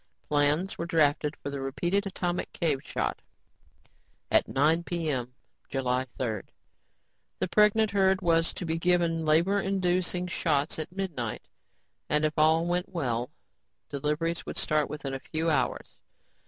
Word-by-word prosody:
Plans 150 Hz, +6 st, +1 dB
were 170 Hz, -, -2 dB
drafted 150 Hz, -3 st, +2 dB
for 140 Hz, -, -6 dB
the 140 Hz, -1 st, -4 dB
repeat 135 Hz, +7 st, -2 dB
atomic 180 Hz, -2 st, -2 dB
cave 155 Hz, -5 st, 0 dB
shot -, -, -2 dB, 1.1 s
at -, -, +4 dB
9:00 155 Hz, +5 st, +2 dB
p.m., 145 Hz, -8 st, -2 dB, 0.3 s
July 130 Hz, -1 st, 0 dB
3rd. 110 Hz, -6 st, -2 dB, 0.9 s
The -, -, -1 dB
pregnant 210 Hz, +3 st, +4 dB
herd 190 Hz, -1 st, +3 dB
was 165 Hz, -2 st, +2 dB
to 180 Hz, -, -5 dB
be 165 Hz, 0 st, -1 dB
given 170 Hz, -2 st, +2 dB
labor 175 Hz, +6 st, +3 dB
inducing 180 Hz, -2 st, 0 dB
shots 155 Hz, -4 st, 0 dB
at 155 Hz, -, -4 dB
midnight, 170 Hz, -, -4 dB, 0.7 s
and, 150 Hz, +1 st, +2 dB
if 155 Hz, -, 0 dB
all 160 Hz, +2 st, +4 dB
went 175 Hz, +1 st, -1 dB
well, 125 Hz, -8 st, -2 dB, 0.6 s
deliveries 150 Hz, +4 st, -1 dB
would -, -, -7 dB
start 155 Hz, -1 st, +1 dB
within 145 Hz, -3 st, -5 dB
a 135 Hz, -, -3 dB
few 160 Hz, +4 st, -1 dB
hours. 150 Hz, -, -1 dB
160 Hz, 140 wpm, -28 LUFS, 145-180 Hz, 1.1 s, at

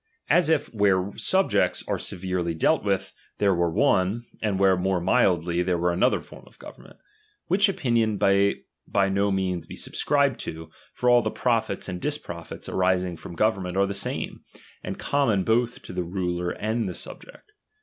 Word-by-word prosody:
As 170 Hz, +1 st, +4 dB
if 160 Hz, -3 st, +2 dB
where 100 Hz, -2 st, +2 dB
subjects 190 Hz, 0 st, +1 dB
are -, -, -1 dB
severely 90 Hz, -2 st, -2 dB
dealt 80 Hz, -, +2 dB
with, -, -, -1 dB, 0.2 s
there 100 Hz, -2 st, +3 dB
were 85 Hz, -1 st, +1 dB
one, 95 Hz, +6 st, +2 dB, 0.2 s
and 105 Hz, -3 st, 0 dB
where 95 Hz, -1 st, +4 dB
more 95 Hz, 0 st, 0 dB
mildly, 90 Hz, -3 st, +2 dB
there 90 Hz, 0 st, 0 dB
were 90 Hz, +1 st, +1 dB
another 85 Hz, -, +2 dB
form -, -, -14 dB
of -, -, -20 dB
government. -, -, -13 dB, 0.5 s
Which 195 Hz, +3 st, +4 dB
opinion 115 Hz, -, +1 dB
may 100 Hz, -6 st, +2 dB, 0.2 s
by 100 Hz, -1 st, +2 dB
no 100 Hz, +1 st, +1 dB
means 95 Hz, -3 st, -1 dB
be -, -, -8 dB
subscribed -, -, 0 dB
to; 80 Hz, 0 st, -7 dB, 0.2 s
for 125 Hz, -, -1 dB
all 120 Hz, 0 st, +6 dB
the -, -, -1 dB
profits -, -, -1 dB
and 90 Hz, -1 st, -5 dB
disprofits 85 Hz, -, -5 dB
arising 90 Hz, -1 st, +1 dB
from 85 Hz, +1 st, -10 dB
government 95 Hz, -3 st, 0 dB
are 100 Hz, -, +4 dB
the 100 Hz, -, -3 dB
same, 100 Hz, -, -4 dB, 0.4 s
and -, -, -5 dB
common 120 Hz, -9 st, +1 dB
both 120 Hz, +4 st, 0 dB
to -, -, -9 dB
the 90 Hz, -, -1 dB
ruler 90 Hz, 0 st, -2 dB
and, 110 Hz, +1 st, -2 dB
the 90 Hz, -, -6 dB
subject. 420 Hz, -, -10 dB
95 Hz, 170 wpm, -25 LUFS, 90-110 Hz, 0.5 s, all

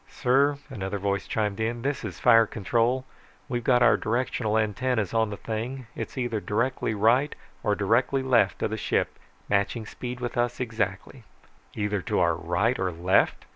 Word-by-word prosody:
"Sir," 140 Hz, +2 st, +2 dB
another 95 Hz, 0 st, -3 dB
voice 100 Hz, 0 st, -2 dB
chimed 105 Hz, -2 st, -1 dB
in, 115 Hz, +1 st, -2 dB
"this 140 Hz, -1 st, -2 dB
is 105 Hz, -5 st, -6 dB
fire 115 Hz, -1 st, +6 dB
control. 120 Hz, +5 st, 0 dB, 0.4 s
We've 120 Hz, -3 st, -2 dB
got 125 Hz, -1 st, +4 dB
our -, -, +5 dB
directional 110 Hz, -1 st, -1 dB
antennas 110 Hz, -1 st, 0 dB
on 110 Hz, -1 st, +2 dB
the 100 Hz, -, -6 dB
thing. 120 Hz, +4 st, -4 dB
It's -, -, -6 dB
either 120 Hz, -4 st, -1 dB
directly 110 Hz, +2 st, -1 dB
right 120 Hz, +8 st, +3 dB, 0.3 s
or 105 Hz, -1 st, +1 dB
directly 115 Hz, +7 st, +1 dB
left 115 Hz, -7 st, +2 dB
of -, -, 0 dB
the 110 Hz, -, -2 dB
ship, -, -, -1 dB, 0.3 s
matching 105 Hz, +3 st, 0 dB
speed 125 Hz, +3 st, -6 dB
with 120 Hz, 0 st, -4 dB
us 120 Hz, 0 st, 0 dB
exactly." 115 Hz, 0 st, -3 dB, 0.5 s
"Either 105 Hz, -2 st, -1 dB
to -, -, -2 dB
our 85 Hz, -2 st, +3 dB
right 90 Hz, +9 st, 0 dB
or 95 Hz, -1 st, 0 dB
left?" 90 Hz, +2 st, +1 dB
115 Hz, 170 wpm, -26 LUFS, 105-125 Hz, 0.5 s, fire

